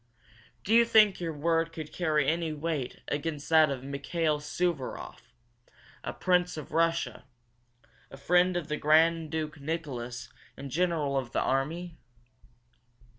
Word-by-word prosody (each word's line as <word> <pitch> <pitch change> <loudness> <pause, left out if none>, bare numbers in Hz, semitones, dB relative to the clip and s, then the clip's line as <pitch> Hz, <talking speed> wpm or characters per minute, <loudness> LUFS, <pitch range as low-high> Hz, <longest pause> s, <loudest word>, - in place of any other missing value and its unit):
Do 215 - 0
you 235 +1 +7
think 215 -3 +5
your 170 -2 -2
word 165 +2 0
would 155 -1 -6
carry 155 -5 +1
any 165 0 0
weight 155 -4 -3
against 145 0 -3
that 160 -2 +6
of 135 -2 -4
Mikail 150 +3 -1
Suvaroff, 150 -2 -4 0.7
a - - -3
prince 180 -2 +1
of 155 - -8
Russia, 165 0 0 0.8
a - - -11
friend 175 +5 +3
of 165 -4 -4
the 150 -1 -2
Grand 160 +1 +3
Duke 155 -1 -4
Nicholas 125 -6 -5 0.2
and 140 -1 -8
General 155 -4 +1
of 120 -3 -7
the - - +1
army?" 160 +6 -2
160 Hz, 135 wpm, -29 LUFS, 145-170 Hz, 0.8 s, you